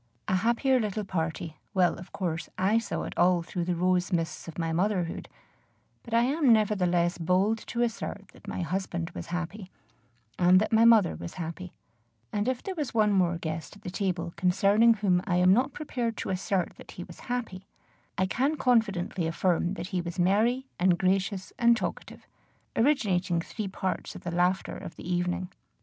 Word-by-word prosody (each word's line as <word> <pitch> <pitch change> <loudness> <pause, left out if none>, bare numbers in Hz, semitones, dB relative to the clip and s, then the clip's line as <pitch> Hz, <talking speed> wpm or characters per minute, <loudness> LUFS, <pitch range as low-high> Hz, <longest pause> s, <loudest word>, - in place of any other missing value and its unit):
A 190 - +2
happier 240 +6 +2
little 215 -1 -2
party 165 -3 -3 0.2
well, 180 -2 +4
of 175 - -11
course, 170 -4 -3
I 200 +5 +3
saw 230 - -4
it - - -5
all 175 -1 +4
through 175 0 -3
the 180 0 0
rose 180 +1 +1
mists 165 -2 -2
of 165 - -8
my 165 -1 -1
motherhood, 180 -1 -1 0.7
but 235 - -13
I 230 +1 +4
am 275 +1 +3
nevertheless 180 -6 +2
bold 185 +6 +2
to 240 0 0
assert 220 -4 -4
that - - -18
my - - -3
husband 175 -1 -3
was - - -7
happy, 180 +3 -5 0.7
and 180 +1 +6
that 215 - -1
my 225 +1 +6
mother 225 - +6
was 85 +2 -8
happy; 170 +1 -6 0.6
and 205 +2 0
if 255 -1 -1
there 385 - -3
was 300 -9 -4
one 210 -2 +4
more 175 -3 +2
guest 160 +1 -5
at 205 - -18
the 180 - -5
table 180 -3 -2
concerning 200 +5 +4
whom 190 -4 +2
I 175 - +1
am 180 +1 +5
not 255 +6 +2
prepared 245 -6 -3
to - - -3
assert 185 0 -1
that - - -12
he - - -7
was - - -13
happy, 225 -6 -4 0.5
I 190 - +2
can 270 +10 0
confidently 200 - +1
affirm 175 +2 0
that 180 -1 -6
he 180 - -1
was 170 +1 -6
merry 220 +8 +2
and 180 -1 +4
gracious 190 +1 0
and 235 0 +5
talkative, - - -5 0.5
originating 195 - +2
three 205 +5 -5
parts 190 0 -3
of - - -10
the 175 - -3
laughter 180 +2 +1
of - - -8
the - - -9
evening. 180 +1 -1
185 Hz, 185 wpm, -28 LUFS, 175-220 Hz, 0.7 s, and